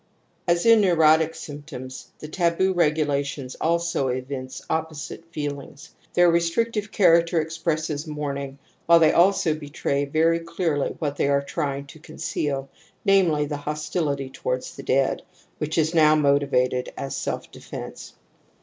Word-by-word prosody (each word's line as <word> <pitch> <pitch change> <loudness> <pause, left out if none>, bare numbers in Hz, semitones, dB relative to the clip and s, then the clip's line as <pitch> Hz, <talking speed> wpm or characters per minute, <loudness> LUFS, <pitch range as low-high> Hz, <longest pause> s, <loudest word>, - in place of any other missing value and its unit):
As 170 +2 +2
in 230 -1 +7
neurotic 160 -3 +4
sjrmptoms, 145 -4 -8
the 155 - -8
taboo 175 +3 +1
regula 150 -4 +2
tions 140 -2 -6
also 170 -3 +1
evince 130 +1 -5
opposite 160 0 -4
feelings. 145 -2 -6 0.2
Their 175 -1 +6
restric 170 +8 +1
tive 210 -1 -3
character 170 -3 +4
expresses 160 -1 -2
mourning, 140 -2 -4 0.3
while 170 0 +8
they 160 -2 +5
also 175 -2 +4
betray 145 -2 -2
very 160 +3 +2
clearly 165 -3 -2
what 145 -3 -3
they - - +1
are 140 0 +2
trying 140 -2 -3
to 140 +3 -14
conceal, 140 -3 -3 0.4
namely, 180 -7 +3
the 145 0 -4
hostility 150 -2 -3
towards 125 -1 -4
the - - -8
dead, 135 +1 +1 0.4
which 155 +2 -2
is 160 +1 +2
now 155 -2 +5
motivated 140 -4 +1
as 135 - -4
self - - -4
defence. - - -9
155 Hz, 140 wpm, -24 LUFS, 140-170 Hz, 0.4 s, while